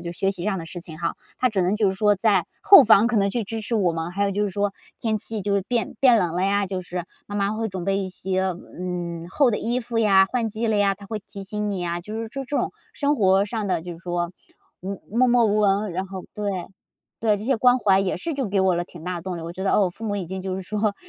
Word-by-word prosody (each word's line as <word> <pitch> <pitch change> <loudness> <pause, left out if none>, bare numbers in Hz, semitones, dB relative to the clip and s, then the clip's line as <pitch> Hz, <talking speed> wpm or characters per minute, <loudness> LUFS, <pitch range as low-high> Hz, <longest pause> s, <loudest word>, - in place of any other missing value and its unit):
就 170 0 -5
学 195 +2 0
习 180 -3 -5
上 200 -2 0
的 165 - -7
事 175 +2 -7
情 160 -3 -9
哈， 170 0 -2 0.2
她 255 - +3
只 200 -5 0
能 185 +3 +1
就 210 -2 +2
是 - - -4
说 210 0 +4
在 195 -3 +2 0.2
后 390 -9 +9
方 220 0 +6
可 245 - +1
能 200 -1 +3
去 235 +2 -1
支 225 +2 -4
持 230 - -3
我 185 -6 +2
们。 165 +1 -3
还 200 +2 0
有 200 - +1
就 205 +2 0
是 205 - -2
说 200 +1 -1 0.3
天 220 -2 0
气 220 +1 -4
就 200 +1 0
是 200 - +1
变 230 +1 -2
变 250 -4 +6
冷 175 -4 0
了 180 - +1
呀， 200 +1 +2
就 185 -1 -4
是 180 0 -5 0.2
妈 205 - -7
妈 200 0 +1
会 225 +1 -2
准 190 -3 -5
备 195 +1 +1
一 195 -1 -2
些， 185 0 -2 0.4
嗯， 175 -2 -4
厚 275 +3 +3
的 210 - 0
衣 240 +2 0
服 235 -1 -5
呀， 195 -3 +5
换 240 -3 0
季 220 +2 -2
了 220 -1 +2
呀， 200 -1 +3
她 200 0 -13
会 215 +1 -4
提 200 - -8
醒 210 +1 -3
你 195 - -3
呀， 175 0 -2
就 210 +4 -7
是 225 - -5
这 275 +4 -5
这 285 +2 -3
种 - - -1 0.2
生 290 0 +1
活 195 -3 +4
上 215 -1 -3
的， 180 -3 0
就 175 +1 -7
是 165 - -11
说 175 0 -3 0.5
无 195 +1 -5 0.2
默 255 +1 +5
默 240 -1 +4
无 210 0 +2
闻， 200 -1 +2
然 190 +2 -3
后 190 -1 -7
对， 200 -4 -3 0.5
对， 215 -2 +3
这 210 - -7
些 265 0 +2
关 250 +2 +4
怀 195 -4 +4
也 195 -1 -1
是 335 -2 -3
就 270 -5 -2
给 195 0 +1
我 190 -1 +3
了 175 0 -1
挺 170 -2 -13
大 180 -1 -3
动 180 0 -5
力， - - -6
我 165 +1 -6
觉 185 - -6
得， 195 - +2
哦， - - +4
我 185 - +1
父 220 +6 -9
母 205 -2 -1
已 185 -4 -4
经 190 +1 -5
就 190 -1 -3
是 190 - -5
说 210 +2 -1
200 Hz, 315 characters per minute, -24 LUFS, 185-220 Hz, 0.5 s, 后